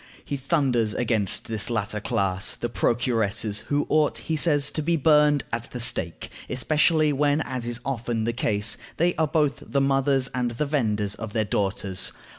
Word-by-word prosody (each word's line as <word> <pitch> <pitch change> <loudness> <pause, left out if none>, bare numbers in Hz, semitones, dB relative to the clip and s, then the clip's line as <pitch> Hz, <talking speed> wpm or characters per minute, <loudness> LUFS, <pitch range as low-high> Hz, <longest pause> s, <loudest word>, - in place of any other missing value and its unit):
He 145 - -3
thunders 135 -6 0
against 110 -5 0
this 110 -2 0
latter 110 -2 -1
class, 100 -4 -1
the 120 - -4
procuresses, 115 -3 0
who 145 0 0
ought, 155 -1 +2
he 160 - -3
says, 145 -2 +3
to 155 - -2
be 170 +3 +1
burned 150 -1 +4
at 115 0 -3
the 125 - -6
stake, 115 -8 0 0.2
especially 155 +3 +2
when, 145 +2 +2
as 125 -4 -4
is 120 0 -3
often 120 -4 -2
the 115 +1 -1
case, 105 -3 0 0.2
they 175 +2 +2
are 160 - +2
both 150 -2 0
the 140 - -1
mothers 135 -1 +2
and 125 -1 0
the 120 +6 -2
venders 105 -8 -1
of 110 -2 -7
their 110 -1 +1
daughters. 95 -2 -1
125 Hz, 175 wpm, -25 LUFS, 110-145 Hz, 0.2 s, burned